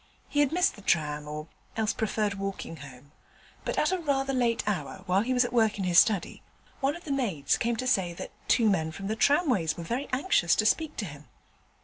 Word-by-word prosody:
He 290 - -1
had 290 -2 +3
missed 360 +3 +2
the 205 - -13
tram, 150 -5 0
or 150 0 -5 0.3
else 220 -1 +1
preferred 215 -1 -1
walking 195 -4 -5
home, 140 0 -13 0.5
but - - -3
at 305 - +2
a 370 - 0
rather 275 -4 0
late 240 -3 +1
hour, 195 -2 -3
while 185 +1 +2
he 240 +4 -2
was 250 -1 +3
at 245 - -5
work 220 -3 +3
in 195 - -2
his 180 -1 +5
study, 200 -6 +1 0.4
one 275 +2 0
of 345 - -10
the 295 - -5
maids 200 - 0
came 235 0 0
to 255 - -4
say 190 -8 +2
that - - -7 0.2
two 230 -3 +4
men 160 -6 +1
from 195 +5 -8
the 215 +2 -1
tramways 245 - +2
was 170 - -6
very 250 +9 -3
anxious 255 - +2
to 215 - +1
speak 310 +7 +1
to 210 - -2
him. 145 -3 -10
215 Hz, 225 wpm, -28 LUFS, 170-260 Hz, 0.5 s, his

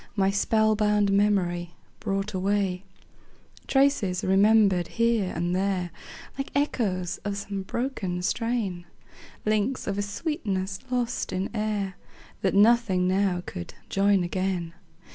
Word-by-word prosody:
My 195 -2 +2
spell 215 +2 +2
bound 210 -1 +2
memory 180 -4 +1 0.2
brought 195 0 -2
away; 190 -1 0 0.8
Traces, 270 -10 +2
remembered 195 -2 +4
here 230 -5 +2
and 175 +2 0
there, 185 -2 0 0.5
Like 275 - -2
echoes 195 - 0
of 205 -1 -4
some 200 -1 -4
broken 190 -5 -3
strain; 205 -6 -1 0.6
Links 215 +4 0
of 200 0 -2
a - - +2
sweetness 200 - -3
lost 245 -1 -1
in 185 +1 -2
air, 210 -3 -2 0.4
That 190 - +1
nothing 205 -4 +4
now 185 -1 +1
could 85 -1 -7
join 195 -1 +3
again. 180 -2 -2
200 Hz, 120 wpm, -26 LUFS, 185-215 Hz, 0.8 s, remembered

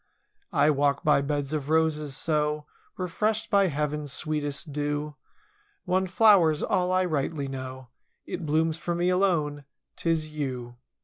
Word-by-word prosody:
I 155 - +4
walk 140 0 +1
by 150 -2 +4
beds 145 0 -2
of 150 -2 -3
roses, 155 -3 +1
so 150 0 0 0.3
Refreshed 215 +5 -1
by 200 -2 +5
Heaven's 150 -2 -2
sweetest 145 +1 -2
dew—■ 145 +1 -2 0.7
One 185 +1 +1
flower's 185 -6 +5
all 180 0 +1
I 185 0 +2
rightly 150 -3 -1
know. 130 -1 -7 0.4
It 175 - -5
blooms 160 +1 +1
for 170 0 -2
me 175 +1 +1
alone—'tis 155 - -1
you. 125 -4 -4
150 Hz, 130 wpm, -27 LUFS, 145-175 Hz, 0.7 s, by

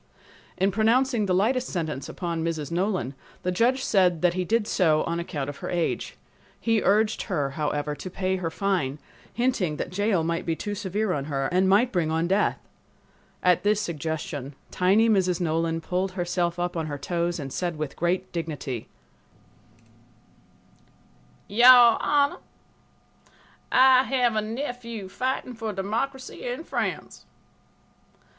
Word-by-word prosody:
In 190 +2 +2
pronouncing 225 +2 +2
the 185 - +2
lightest 245 +7 +1
sentence 155 -6 -4
upon 170 -3 -3
Mrs. 160 -3 -3
Nolan, 180 -5 -1 0.3
the 180 - 0
judge 245 +8 +2
said 180 -4 +2
that 175 -1 +4
he 185 0 -1
did 220 +4 +1
so 160 -7 +2
on 170 0 -2
account 150 -5 -4
of 145 -1 -6
her - - -6
age. 175 -2 -2 0.4
He 225 -2 +1
urged 215 +2 +2
her, 145 -7 -1
however, 150 0 -2
to 185 - -7
pay 185 +1 -1
her 175 -3 -2
fine, 160 -6 -1 0.3
hinting 225 -11 0
that - - -4
jail 200 -2 +1
might 170 +2 -1
be 165 - -1
too 205 +5 -4
severe 205 0 -1
on 140 -1 -2
her 135 -2 -1
and 185 +1 +3
might 225 +6 +4
bring 170 -4 0
on 160 +1 0
death. 195 +3 +2 0.9
At 180 -2 +4
this 210 0 +2
suggestion, 150 -5 -4 0.2
tiny 200 +5 +3
Mrs. 185 -5 +2
Nolan 165 -1 0
pulled 185 +3 -2
herself 175 -1 -1
up 175 0 -2
on 160 -2 -2
her 145 -1 -4
toes 170 +3 -2
and 135 -2 -6
said 175 -2 -2
with 155 -2 -5
great 175 +2 -1
dignity: 150 -8 -4 2.6
"Your 240 +2 +7
Honor, 285 -1 +2 1.3
I 260 0 +7
have 250 -4 +1
a 215 - +2
nephew 235 -3 -5
fighting 255 +4 -2
for 225 -2 -4
democracy 245 +8 -3
in 245 +6 -4
France. - - -4
185 Hz, 150 wpm, -25 LUFS, 165-220 Hz, 2.6 s, Your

